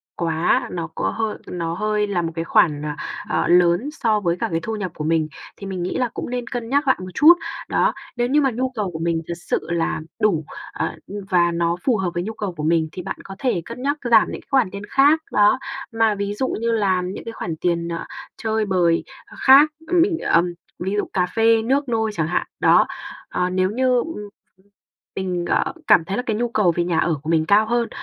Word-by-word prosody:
quá 170 +9 +1
nó 170 -2 -3
có - - 0
hơi 220 -1 -2
nó 165 -2 -3
hơi 210 +2 0
là 190 -3 0
một 165 -1 -3
cái 165 0 -3
khoản, 150 -3 +3
ờ, 150 - -3 0.4
ờ, - - +1
lớn 175 +8 +4
so 220 -7 +1
với 175 -3 0
cả - - 0
cái 165 - 0
thu 220 +5 -3
nhập 190 -4 -4
của 150 - -5
mình, 160 0 +1 0.3
thì 200 - -8
mình 185 -2 -4
nghĩ 180 - -2
là 250 -2 0
cũng - - -5
nên 245 -1 -3
cân 240 -2 -5
nhắc 285 +2 +1
lại 260 - +4
một 185 - -6
chút. 310 - +8 0.4
Đó, - - +2 0.2
nếu 240 0 0
như 290 +4 +3
mà 270 -2 +2
nhu 255 +3 -1
cầu 205 -5 -2
của 160 - -6
mình 165 0 0
thật 170 - -3
sự - - +1
là 165 -2 -1 0.2
đủ, 165 -8 +2 0.3
ờ, - - -3 0.3
và 175 -1 +3
nó 170 0 0
phù 250 -5 +2
hợp 185 -2 -1
với 175 - -2
nhu 220 +4 -5
cầu 205 -4 -4
của 150 - -4
mình 160 0 +2
thì 180 - -6
bạn 195 +2 -5
có 195 - -9
thể 245 -10 0
cân 235 +2 -8
nhắc 285 +3 0
giảm 225 -2 +6
những - - -6
cái - - -29
khoản 265 -9 +3
tiền 200 0 -7
khác, 290 +4 +4
đó, 210 +5 +4 0.3
mà 225 -2 +2
ví 200 0 -3
dụ 260 +5 -1
như 230 +1 0
là 195 -5 +1
những 180 +1 -5
cái 230 - -5
khoản 170 -7 -4
tiền, 170 -1 0
ờ, 170 0 -4 0.3
chơi 220 -1 -1
bời, 175 -4 +2 0.2
ơ, - - -15
khác, 275 +3 +7 0.2
ờ, 355 - -5
mình, 350 0 +3
ờm, 175 +1 +2 0.3
ví 190 +3 -2
dụ 205 - 0
cà 180 -2 +2
phê, 225 0 +4
nước 270 +4 0
nôi 220 -2 0
chẳng 160 -5 -1
hạn, 175 - -1
đó, - - +5 0.4
ờ, 180 - -1
nếu 185 0 +1
như, 255 +2 +2
ừm, 325 +7 -2 1.0
mình, 180 -2 -2
ờ, - - +1
cảm 165 - +5
thấy 195 +4 -3
là 245 - -1
cái 220 - 0
nhu 240 +2 0
cầu 210 -6 +2
về 175 - +1
nhà 170 -2 0
ở 170 - +2
của 155 - -4
mình 160 -1 +2
cao 210 +3 +4
hơn. 235 +1 0
200 Hz, 240 wpm, -21 LUFS, 170-235 Hz, 1.0 s, chút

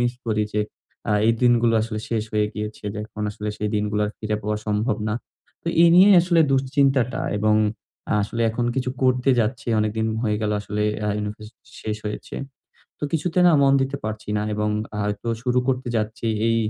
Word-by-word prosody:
Miss 120 0 +1
করি 110 -1 +1
যে, 105 - +1 0.5
আ - - +3
এই 115 - +5
দিনগুলো 120 -1 +4
আসলে 110 -1 -4
শেষ 110 -2 0
হয়ে 105 -1 +2
গিয়েছে 105 0 -6
যে, 105 - -6
এখন 105 0 -7
আসলে 105 +1 -5
সেই 105 - -1
দিনগুলো 105 0 0
আর - - -4
ফিরে 110 -1 -2
পাওয়া 105 +1 -1
সম্ভব 105 +4 0
না। 105 - 0 0.5
তো 170 - -3
এই 170 - +7
নিয়েই 195 +3 +8
আসলে 170 -2 +3
দুশ্চিন্তাটা 135 -2 +2 0.2
এবং 105 +1 +3 0.6
আ - - +2
আসলে 115 +3 -2
এখন 120 +2 -2
কিছু 125 -1 0
করতে 130 +1 +3
যাচ্ছি। 115 +2 -2
অনেকদিন 110 +1 0 0.2
হয়ে 105 -3 +1
গেল 105 - 0
আসলে 105 0 -3 0.2
আ - - 0
ইউনিভার্সিটি 105 +1 -6 0.2
শেষ 105 -1 -2
হয়েছে। 105 - -6 0.6
তো - - -4
কিছুতে 165 +3 0
না 175 - +6
মন 135 - +5
দিতে 135 +1 -2
পারছি 110 0 -5
না 105 - 0
এবং 105 0 0 0.3
আ - - -3 0.2
তো 120 - -4
শুরু 125 0 +1
করতে 130 -1 0
যাচ্ছি। 110 +2 -2 0.2
এই 115 - +2
110 Hz, 195 wpm, -23 LUFS, 105-130 Hz, 0.6 s, নিয়েই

